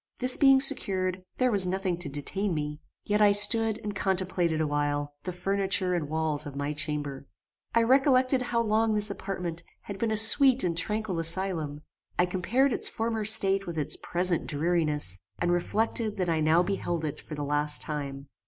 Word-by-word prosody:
This 255 0 +4
being 270 -2 +4
secured, 185 -9 +2
there 255 -1 +1
was 195 -4 +6
nothing 190 -1 -2
to 170 -5 +1
detain 175 +7 0
me; 150 0 -5 0.2
yet 210 +1 -1
I 205 -1 +5
stood 220 +1 +4
and 210 -1 -5
contemplated 185 -4 -1
awhile 145 -1 -2
the 180 - -3
furniture 190 0 -1
and 160 -5 -3
walls 155 -1 -2
of 140 - -10
my 145 +1 -4
chamber. 145 -2 -5 0.5
I 230 - +4
remembered 260 +1 +2
how 240 -1 -1
long 220 0 0
this 210 0 -1
apartment 180 -4 -6 0.2
had 200 -1 -9
been 230 - -1
a 220 - -1
sweet 260 +4 +6
and 170 -2 -1
tranquil 210 +1 -3
asylum; 165 -3 -1 0.4
I 175 - +3
compared 235 +9 0
its - - -1
former 225 -1 -3
state 195 -2 +4
with 170 -2 -6
its 150 0 0
present 175 -1 -2
dreariness, 150 - 0 0.2
and 175 0 -1
reflected 215 +4 -2
that 180 -2 -2
I 165 -1 0
now 160 +3 +2
beheld 175 -4 -3
it 150 - -6
for 155 - -9
the 145 - -5
last 150 +1 0
time. 140 -2 -6
180 Hz, 180 wpm, -26 LUFS, 155-215 Hz, 0.5 s, was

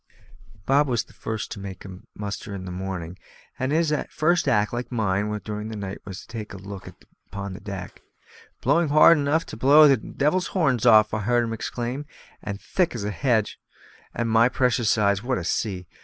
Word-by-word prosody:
Bob 140 +4 +3
was 120 -4 0
the - - -21
first 110 -1 -5
to - - -6
make 95 -1 -8
a 95 -2 -9 0.2
muster 100 0 -5
in 95 -1 -7
the 90 - -6
morning; 90 -1 -5 0.4
and 130 +1 -1
his 160 0 +2 0.2
first 170 +1 +1
act, 105 -5 +2
like 120 +2 -4
mine 105 -3 0 0.2
during 105 0 -4
the 110 - -6
night, 100 -2 -6
was 95 -2 -7
to - - -17
take 110 -3 -7
a - - -7
look 100 0 -9
out - - -14 0.2
upon 100 -1 -6
deck. 95 -2 -8 0.6
"Blowing 170 -1 +3
hard 155 +3 +7
enough 145 +3 +1
to - - -8
blow 145 +6 +7
the 135 -2 +5
devil's 155 +8 -1
horns 130 - +2
off," 110 -2 +6
I 110 - 0
heard 120 +3 +2
him 115 -1 -3
exclaim, 125 +5 -4 0.3
"and 100 -1 -5
as - - -24
thick 180 -8 0
as 110 - -4
a 105 - -2
hedge. 110 -2 0 0.5
And, 120 - -2
my 115 +2 +4
precious 125 -3 +1
eyes! 100 -2 +2
what 125 +2 -1
a 90 - -4
sea! 90 0 -2
110 Hz, 200 wpm, -24 LUFS, 100-130 Hz, 0.6 s, hard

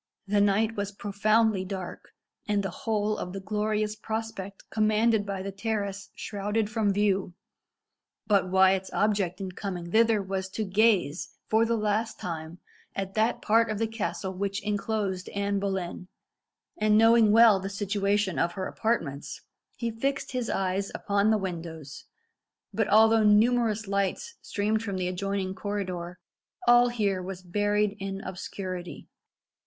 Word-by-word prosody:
The 205 0 +2
night 210 +3 +2
was 200 0 -3
profoundly 205 0 +1
dark, 190 -1 -7 0.3
and 205 -2 +1
the 195 - -3
whole 215 -6 -1
of 180 - -5
the 195 - -4
glorious 210 +1 -1
prospect 220 -3 -5
commanded 215 0 +2
by 195 -1 -3
the 195 - -4
terrace 200 -1 -3
shrouded 210 +1 -2
from 215 -3 +1
view. 195 -3 0 0.9
But 195 -3 +2
Wyat's 190 0 +3
object 200 -4 +1
in 190 -1 -4
coming 180 -3 -5
thither 225 0 +4
was 190 -1 -3
to 220 - -1
gaze, 195 -5 +1
for 225 +1 +2
the 230 - +1
last 215 +1 -1
time, 165 -1 -5 0.4
at 195 -1 -3
that 220 +3 +1
part 225 +1 +3
of 215 - -2
the 225 - +1
castle 190 -4 -3
which 195 +1 -3
enclosed 205 -2 -2
Anne 200 0 0
Boleyn, 190 -2 -3 0.7
and 215 0 +4
knowing 225 -1 +6
well 225 -2 +7
the 190 +1 -4
situation 200 -1 0
of 170 - +1
her 190 0 -4
apartments, 170 -14 -2 0.4
he 235 -1 -2
fixed 270 +5 -2
his 250 -3 -2
eyes 195 +1 -1
upon 200 +1 +1
the 220 - +4
windows; 165 -6 -6 0.7
but 220 - +1
although 220 +2 +6
numerous 215 0 +3
lights 200 - -1
streamed 215 +1 -1
from 200 -4 -3
the 180 -1 -1
adjoining 190 +1 -2
corridor, 185 -4 -4 0.5
all 240 0 +6
here 205 -6 0
was 185 0 -7
buried 205 +2 +1
in 195 0 -4
obscurity. 185 -1 -6
200 Hz, 145 wpm, -27 LUFS, 190-220 Hz, 0.9 s, well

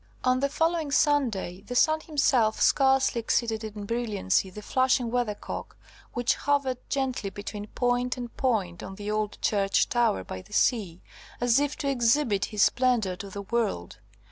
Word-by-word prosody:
On 255 0 +2
the 280 +1 +1
following 325 +1 0
Sunday, 260 - +1
the 245 +4 -7
sun 310 +5 +4
himself 260 -8 +2
scarcely 270 -2 +3
exceeded 225 -1 0
in 210 -1 -6
brilliancy 205 -4 0
the 210 +3 -10
flashing 255 -1 +1
Weathercock, 240 -4 -3 0.4
which 240 0 +2
hovered 275 -3 0
gently 260 -7 -1
between 205 +1 -7
point 245 +2 0
and 240 -1 -7
point 200 -10 -1
on 190 - -8
the 205 +1 -5
old 215 -1 -2
church 200 -2 +2
tower 235 - +1
by 95 - -7
the - - -16
sea, 190 -8 +1 0.4
as 245 +1 +3
if 290 0 -1
to 280 - -3
exhibit 240 -4 +2
his 210 -2 +1
splendour 240 -7 +2
to 200 +1 -7
the 200 +1 -6
world. 200 - -2
235 Hz, 160 wpm, -27 LUFS, 205-260 Hz, 0.4 s, sun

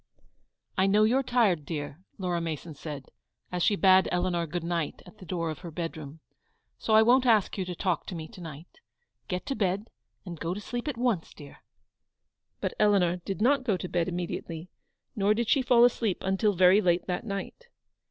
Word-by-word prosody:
"I 190 - +4
know 210 +2 +4
you're 245 +5 +3
tired, 225 - +2
dear," 145 0 -5 0.2
Laura 180 -3 -1
Mason 160 0 -5
said, 145 -2 -8 0.4
as 180 -1 -2
she 205 - +3
bade 190 -1 +5
Eleanor 175 -1 0
good 170 +2 -4
night 170 -2 -3
at 215 - -16
the 185 - -12
door 170 -3 -2
of 155 - -8
her 175 - -8
bed 165 +1 -4
room, 155 0 -10 0.3
" - - -46
so 220 - +2
I 220 - +8
won't 250 +2 +4
ask 220 -4 +3
you 190 - -2
to 180 -1 -5
talk 180 -3 -1
to 180 - -5
me 160 -1 -6
to 180 - -12
night. 160 - -10 0.5
Get 180 0 -3
to 275 - -2
bed, 200 0 -1 0.3
and 170 -3 -7
go 170 +2 -2
to - - -5
sleep 240 +5 -5
at 285 -5 -3
once, 235 -9 -1
dear." 145 -1 -12 1.0
But - - -1
Eleanor 195 -4 +3
did 195 +4 -4
not 265 +2 +3
go 215 -7 +1
to 180 - -5
bed 175 -1 0
immediately; 175 -1 -5 0.4
nor 205 +1 +2
did 235 0 -1
she 275 - +3
fall 245 -2 +5
asleep 225 -5 0
until 195 +2 +2
very 185 +3 +5
late 175 -2 +2
that 180 -1 -3
night. 210 - -6
185 Hz, 200 wpm, -28 LUFS, 170-215 Hz, 1.0 s, I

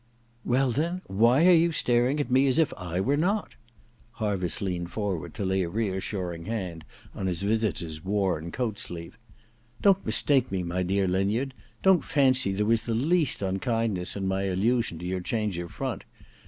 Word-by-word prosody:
* 115 0 -36
Well, 130 0 +3
then, 170 +8 -1
why 120 - +3
are 185 - +7
you 170 0 +5
staring 125 0 +1
at 140 -4 -2
me 130 +2 +4
as 130 - +2
if 160 -2 +3
I 90 -2 -4
were 135 +9 +1
not? 195 +8 0 0.3
' 115 -1 -33
Harviss 95 -6 -1
leaned 90 -3 -3
forward 90 -5 -3
to 100 - -3
lay 95 0 +1
a 85 - -2
reassuring 95 -4 -3
hand 90 -7 -4 0.3
on 95 - -3
his 90 +1 -1
visitor's 90 -7 -1
worn 95 -4 -1
coat 115 -3 -2
sleeve. 85 +3 -5 0.4
' 120 +1 -29
Don't 195 -1 +4
mistake 135 -4 +2
me, 95 -2 -1
my 90 +1 -2
dear 95 +2 +1
Linyard. 100 +9 0 0.3
Don't 190 -3 +5
fancy 130 -7 +3
there 100 +2 0
was 115 +1 +3
the 115 -1 -2
least 150 - +2
unkindness 100 -1 -1
in 95 -1 -2
my 95 +1 0
allusion 100 +1 0
to 85 - -7
your 90 0 -2
change 105 -2 -2
of 85 -1 -6
front. - - -4
105 Hz, 185 wpm, -27 LUFS, 95-125 Hz, 0.4 s, are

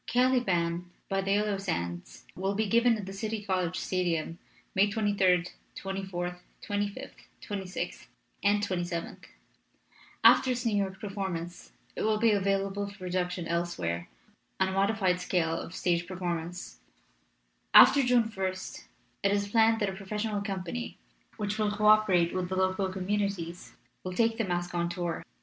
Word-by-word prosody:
"Caliban 185 -9 +1 0.2
by 195 0 +1
the 195 +1 +1
Yellow 205 -1 +1
Sands 85 - -4
will 195 +2 -1
be 220 +2 +1
given 235 +2 +4
at 205 - -6
the 195 - -7
City 215 +1 -4
College 185 -3 0
Stadium 170 -3 -1 0.3
May 200 +2 +4
23d, 195 -4 +2 0.2
24th, 190 -2 -4 0.3
25th, 205 +6 -2 0.3
26th, 195 -2 -5 0.4
and 205 0 +3
27th. 175 -3 -3 1.0
After 260 - +7
its 245 -1 -1
New 225 -3 +2
York 195 -1 -1
performance 190 -4 -5 0.2
it - - -4
will 215 0 +2
be 225 +1 +4
available 195 0 0
for 200 - -13
production 180 -2 -2
elsewhere 90 - -2 0.5
on 190 0 +3
a - - -3
modified 195 -2 +1
scale 175 -3 0
of 170 - -8
stage 175 -1 0
performance. 175 -1 -4 1.0
After 285 - +9
June 245 -3 +2
ist 185 0 -6 0.4
it 200 - +2
is 200 0 0
planned 225 +1 +4
that 205 - +2
a - - -4
professional 210 +2 -3
company, 200 +3 -4 0.4
which 210 0 -2
will 210 -1 +2
co 210 0 -1
operate 205 -5 +5
with 185 -1 -2
the 190 - -2
local 190 +1 +1
communities, 190 -2 -3 0.3
will 185 - -4
take 225 +3 +1
the 225 - +1
masque 175 -1 -2
on 170 0 0
tour. 175 -1 -3
195 Hz, 150 wpm, -29 LUFS, 180-210 Hz, 1.0 s, After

